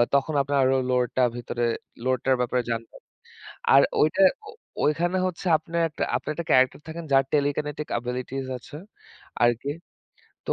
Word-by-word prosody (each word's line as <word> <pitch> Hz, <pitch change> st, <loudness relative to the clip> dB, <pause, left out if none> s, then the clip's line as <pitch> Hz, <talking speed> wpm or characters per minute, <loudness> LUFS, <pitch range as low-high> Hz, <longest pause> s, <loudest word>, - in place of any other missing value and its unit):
তখন 140 Hz, +3 st, +1 dB
আপনার 140 Hz, +1 st, -1 dB
আরো 130 Hz, +1 st, +3 dB, 0.2 s
লোটা 125 Hz, 0 st, +1 dB
ভিতরে 120 Hz, 0 st, -4 dB, 0.4 s
লোয়ারটার 130 Hz, +1 st, +2 dB
ব্যাপারে 125 Hz, 0 st, 0 dB
জানবেন। 115 Hz, 0 st, -6 dB, 0.7 s
আর 135 Hz, -, +8 dB, 0.2 s
ওইটা 155 Hz, +5 st, +3 dB, 0.3 s
ও -, -, -7 dB, 0.3 s
ওইখানে 170 Hz, +5 st, +1 dB
হচ্ছে 185 Hz, +1 st, -5 dB
আপনার 170 Hz, +2 st, -3 dB
একটা 155 Hz, -, -3 dB
আপনার -, -, -3 dB
একটা 170 Hz, +1 st, -5 dB
ক্যারেক্টার 130 Hz, +2 st, +4 dB
থাকেন 165 Hz, +1 st, -6 dB
যার 135 Hz, 0 st, +5 dB
telekinetic 150 Hz, +1 st, -1 dB
abilities 125 Hz, +2 st, -4 dB
আছে 145 Hz, -, -12 dB, 0.7 s
আরকি। 120 Hz, +4 st, +1 dB, 0.8 s
তো -, -, +1 dB
135 Hz, 145 wpm, -25 LUFS, 125-150 Hz, 0.8 s, আর